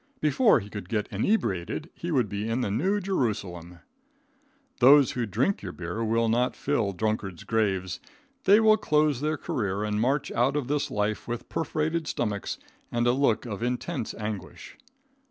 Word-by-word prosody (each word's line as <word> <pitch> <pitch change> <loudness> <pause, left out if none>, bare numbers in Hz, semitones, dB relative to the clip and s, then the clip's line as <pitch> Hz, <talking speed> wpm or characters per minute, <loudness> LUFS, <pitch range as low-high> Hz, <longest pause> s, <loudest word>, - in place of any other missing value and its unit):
Before 180 - +4
he 100 - -8
could 105 0 -8
get 105 -3 -1
inebriated 110 - -1
he 170 - -6
would 130 -9 +2
be 105 +2 -3
in 115 +3 0
the 105 - -1
New 185 - +1
Jerusalem. 100 - -3 1.0
Those 135 +2 +7
who 120 -2 -2
drink 120 - 0
your 90 -3 -6
beer 90 +6 -4
will 115 +1 +1
not 120 +3 +1
fill 120 -8 0
drunkards' 100 -2 -2
graves. 95 -5 0 0.5
They 205 +3 +7
will 215 -1 +5
close 150 - +2
their 155 +1 0
career 100 -7 -2
and 105 0 -1
march 135 +4 +1
out 130 +4 +1
of 145 -4 -1
this 145 0 0
life 105 +1 -2
with 120 -1 -5
perforated 160 0 -1
stomachs 105 -8 -2 0.3
and 120 0 0
a 120 - +5
look 130 -3 +1
of 110 -3 -5
intense 120 -2 -2
anguish. 105 -2 -6
115 Hz, 165 wpm, -27 LUFS, 105-145 Hz, 1.0 s, Those